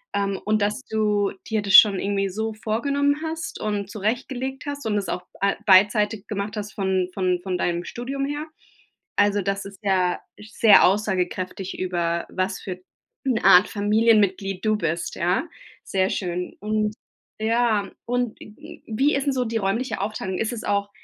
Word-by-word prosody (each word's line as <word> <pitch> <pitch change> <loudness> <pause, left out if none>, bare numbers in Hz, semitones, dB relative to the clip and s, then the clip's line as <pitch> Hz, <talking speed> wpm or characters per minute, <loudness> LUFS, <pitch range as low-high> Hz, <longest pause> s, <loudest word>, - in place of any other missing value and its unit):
Ähm, 200 -1 -1
und 215 0 +1
dass 210 +5 0
du 210 -2 +1 0.2
dir 220 -1 0
das 200 -1 +3
schon 200 -4 +8
irgendwie 195 -1 0
so 220 +3 -3
vorgenommen 280 +7 0
hast 320 +1 -5
und 205 -2 -2
zurechtgelegt 250 +6 -3
hast 285 -2 -5
und 210 - +1
es 200 - -2
auch 180 - -3 0.2
a 200 0 +2
beidseitig 210 +2 +4
gemacht 205 0 -4
hast 210 0 -5
von 190 -2 0
von 185 -2 0
von 185 -2 -2
deinem 175 -1 -1
Studium 275 +3 -4
her, 290 +2 -3 0.7
also, 205 0 +3
das 195 +1 -2
ist 195 -1 -11
ja 185 -2 +1 0.2
sehr 215 0 +5
aussagekräftig 190 -1 -1
über 170 -2 -1
was 185 +1 -2
für 185 -2 -6 0.5
'ne 250 -5 0
Art 180 +3 +8
Familienmitglied 205 -3 +2
du 215 0 +2
bist, 165 -2 -2
ja. 180 - 0 0.4
Sehr 190 -1 0
schön. 180 -1 -3
Und, 215 0 -1 0.4
ja 220 -3 +1
und 245 -2 -2
w 215 - -13
wie 270 +7 +2
ist 275 - -1
denn 280 - +1
so 255 -1 0
die 225 0 -1
räumliche 225 +5 -1
Aufteilung? 190 -3 -3
Ist 225 +2 -1
es 230 - -6
auch 200 0 0
205 Hz, 165 wpm, -23 LUFS, 190-225 Hz, 0.7 s, schon